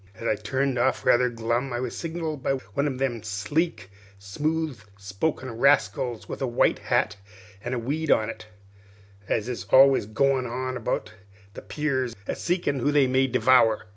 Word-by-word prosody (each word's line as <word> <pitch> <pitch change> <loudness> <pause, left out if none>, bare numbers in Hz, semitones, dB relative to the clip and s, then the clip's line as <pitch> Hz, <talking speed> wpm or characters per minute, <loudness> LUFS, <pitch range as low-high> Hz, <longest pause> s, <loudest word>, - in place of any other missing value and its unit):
As 115 - -5
I - - +3
turned 135 -1 -1
off 130 +2 +1
rather 125 +1 +4
glum 120 +3 -2
I 120 - -2
was 125 -1 -4
signalled 160 -3 -4
by 135 - 0 0.2
one 140 +1 +1
of 135 -3 -3
them 130 -4 -1
sleek, 105 - -2 0.3
smooth 150 +7 -2 0.2
spoken 105 +7 -3
rascals 120 -2 +1
with - - -7
a 135 - 0
white 120 - +2
hat 100 - 0 0.5
an' 125 +1 -2
a - - -2
weed 145 +7 -3
on 110 - +3
it, 110 -1 -8 0.8
as 110 0 0
is 125 -2 -5
always 135 -5 +5
goin' 130 +3 +1 0.3
about 110 -3 -3 0.4
the - - -9
piers 130 -5 -2
a - - -3
seekin' 170 -6 -1
who 145 +4 +1
they 145 -2 +4
may 130 +1 +2
devower. 125 -3 +4
130 Hz, 170 wpm, -25 LUFS, 115-140 Hz, 0.8 s, always